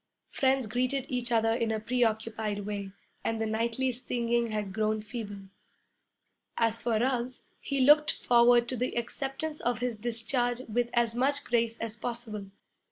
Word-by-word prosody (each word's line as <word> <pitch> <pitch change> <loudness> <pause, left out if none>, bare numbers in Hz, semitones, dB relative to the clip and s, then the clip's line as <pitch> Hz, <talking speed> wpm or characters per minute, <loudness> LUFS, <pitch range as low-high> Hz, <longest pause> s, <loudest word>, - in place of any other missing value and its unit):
Friends 265 -1 +2
greeted 250 +4 -1
each 245 -1 -1
other 225 -1 +3
in 230 -1 0
a 220 - 0
preoccupied 220 -3 -1
way, 200 -2 -4 0.3
and 225 0 -1
the 225 - 0
nightly 230 +4 0
singing 235 -1 0
had 210 -3 -3
grown 215 0 +1
feeble. 210 -2 -6 1.2
As 230 0 +1
for 235 -2 +1
Ruggs, 250 +1 -1 0.2
he 275 -1 -1
looked 295 +3 +6
forward 240 0 +4
to 255 - -2
the 250 0 -2
acceptance 270 +6 -3
of 240 -1 0
his 245 -1 -2
discharge 240 +2 0
with 240 +2 0
as 235 -1 +3
much 280 +4 +1
grace 230 -1 +1
as 225 -1 -4
possible. 230 -3 -5
235 Hz, 155 wpm, -29 LUFS, 220-250 Hz, 1.2 s, looked